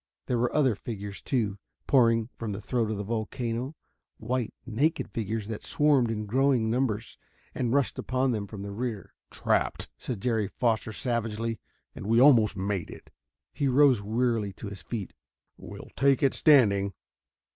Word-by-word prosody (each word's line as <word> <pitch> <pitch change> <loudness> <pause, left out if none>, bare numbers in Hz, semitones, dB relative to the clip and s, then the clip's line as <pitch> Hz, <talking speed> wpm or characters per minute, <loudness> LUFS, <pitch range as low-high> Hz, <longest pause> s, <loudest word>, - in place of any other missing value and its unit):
There 125 -2 0
were 120 +1 +1
other 135 -5 +3
figures, 100 -1 -7
too, 105 -7 -1 0.3
pouring 115 -3 +3
from 110 -3 -4
the 100 - -5
throat 115 +1 -1
of 110 - -2
the 100 - -3
volcano 115 +5 -3 0.4
white, 125 -3 -2
naked 140 +8 0
figures 110 -1 -3
that 110 -1 -5
swarmed 145 -6 +2
in 110 -1 -2
growing 125 0 +2
numbers 115 -3 -1 0.3
and 120 -2 -1
rushed 140 0 +1
across - - -3
upon 130 +1 +1
them 105 -3 -2
from 100 -1 -8
the 100 - -5
rear. 110 -2 -4 0.2
"Trapped," - - 0
said 120 -6 -4
Jerry 115 -3 0
Foster 110 +1 0
savagely, 115 -2 -2 0.3
"and - - -7
we 115 +1 +4
almost 115 -7 +6
made 95 -2 -2
it." - - -12 0.4
He 140 - 0
rose 130 -3 +5
wearily 110 -1 0
to 100 +2 -7
his 100 -3 -8
feet. 100 +1 -5 0.4
"We'll - - -10
take 135 0 +3
it 135 - +4
standing." 100 -10 +4
115 Hz, 165 wpm, -28 LUFS, 105-125 Hz, 0.4 s, almost